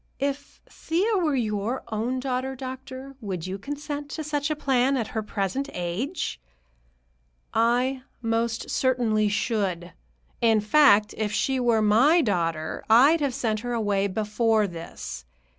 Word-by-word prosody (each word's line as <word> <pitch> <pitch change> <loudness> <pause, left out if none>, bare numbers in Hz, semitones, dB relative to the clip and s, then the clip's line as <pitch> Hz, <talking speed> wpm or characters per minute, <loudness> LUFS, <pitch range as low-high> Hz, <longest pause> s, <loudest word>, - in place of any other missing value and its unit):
"If 280 +1 -4
Thea 395 +7 0
were 310 -5 +1
your 220 0 -1
own 230 +4 -1
daughter, 260 0 -2
doctor, 260 +1 -8
would 185 -6 -4
you 190 +1 -5
consent 290 +4 -5
to 315 - -5
such 295 0 -1
a 305 - 0
plan, 270 -2 +2
at 230 -4 -2
her 220 - -2
present 210 +6 -2
age?" 180 - -3 1.1
"I 245 +3 +2 0.2
most 230 0 -1
certainly 230 -5 +2
should. 195 -5 -1 0.5
In 225 -2 +4
fact, 210 -2 +5
if 215 -1 0
she 265 +5 0
were 235 -3 +2
my 245 +11 +5
daughter, 165 - -1
I'd 275 +9 +6
have 275 -4 0
sent 220 -2 -1
her 245 +2 -4
away 205 -3 +1
before 215 +2 +1
this. 170 - -7
235 Hz, 140 wpm, -25 LUFS, 210-270 Hz, 1.1 s, I'd